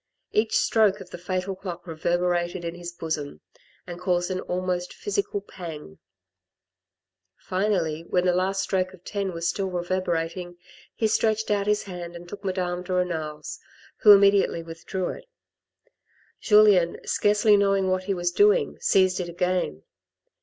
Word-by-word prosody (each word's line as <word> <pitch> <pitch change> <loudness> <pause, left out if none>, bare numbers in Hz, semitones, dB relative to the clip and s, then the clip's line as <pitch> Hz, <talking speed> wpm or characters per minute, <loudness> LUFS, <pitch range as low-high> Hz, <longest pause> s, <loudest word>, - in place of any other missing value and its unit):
Each 215 +1 +2
stroke 215 -3 +3
of 185 -2 -12
the - - -8
fatal 185 +1 -3
clock 180 -2 -7
reverberated 175 +1 -1
in 170 - -3
his 175 0 -7
bosom, 155 - -5 0.4
and 175 -1 -8
caused 180 0 0
an 185 - -2
almost 180 0 -3
physical 405 - -2
pang. 160 - -9 1.4
Finally, 185 -5 -1
when 180 0 +1
the 180 - +3
last 190 +2 0
stroke 185 -1 -1
of 180 - -25
ten 200 -1 -3
was 170 -1 -3
still 195 +3 -1
reverberating, 175 -1 -2 0.4
he 225 - -1
stretched 220 0 +1
out 205 -1 +1
his 210 0 +2
hand 175 -3 -7
and 175 0 -10
took 200 +3 -9
Madame 180 -2 -2
de 180 +1 -8
Renal's, 160 -4 -2 0.4
who 210 - +7
immediately 200 -4 +5
withdrew 165 +3 -4
it. - - -8 1.1
Julien, 205 -5 +5
scarcely 210 +1 +3
knowing 195 -1 +2
what 185 0 -1
he 195 0 0
was 175 -1 -1
doing, 420 - +3
seized 185 -1 +3
it 175 -1 -3
again. 175 - -1
185 Hz, 145 wpm, -25 LUFS, 175-195 Hz, 1.4 s, who